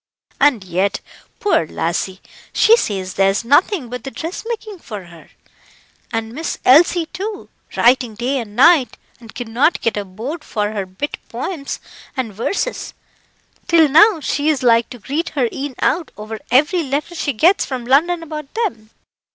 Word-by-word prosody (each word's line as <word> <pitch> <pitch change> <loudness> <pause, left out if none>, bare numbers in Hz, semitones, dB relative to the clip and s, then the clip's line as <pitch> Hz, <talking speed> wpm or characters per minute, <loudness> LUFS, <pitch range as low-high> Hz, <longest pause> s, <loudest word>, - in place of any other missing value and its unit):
And 275 -8 +3
yet, 190 +2 -1 0.4
poor 400 - +2
lassie, 180 +4 -2 0.3
she 450 - +6
says 190 - -2
there's 195 +3 +2
nothing 295 - +3
but 250 +1 -7
the 270 - -5
dressmaking 405 - -6
for 210 - -8
her. 170 -2 -15 0.8
And 225 -1 -3
Miss 315 +5 -3
Elsie, 330 +5 +5
too, 390 +6 -6 0.3
writing 245 -2 +3
day 255 +5 -1
and 210 -3 -8
night, 275 -2 +5 0.2
and 230 -3 -14
cannot 245 +6 +1
get 230 - 0
a 205 - -1
bode 235 - -6
for 210 -5 -2
her 200 -3 -4
bit 190 +11 -5
poems 280 +4 -4 0.4
and 235 -5 -2
verses, 395 - -3 0.7
till 330 -2 +5
now 330 +6 +6
she 295 +1 0
is 290 -4 0
like 230 -1 +4
to 245 - -9
greet 290 +9 -3
her 250 -3 +3
een 275 -1 -5
out 330 +3 +1
over 215 +1 -7
every 300 +8 +3
letter 290 +3 -3
she 320 -3 -1
gets 335 - +3
from 255 -3 -5
London 330 +7 +2
about 305 -3 -7
them. 375 - -2
260 Hz, 160 wpm, -19 LUFS, 220-325 Hz, 0.8 s, she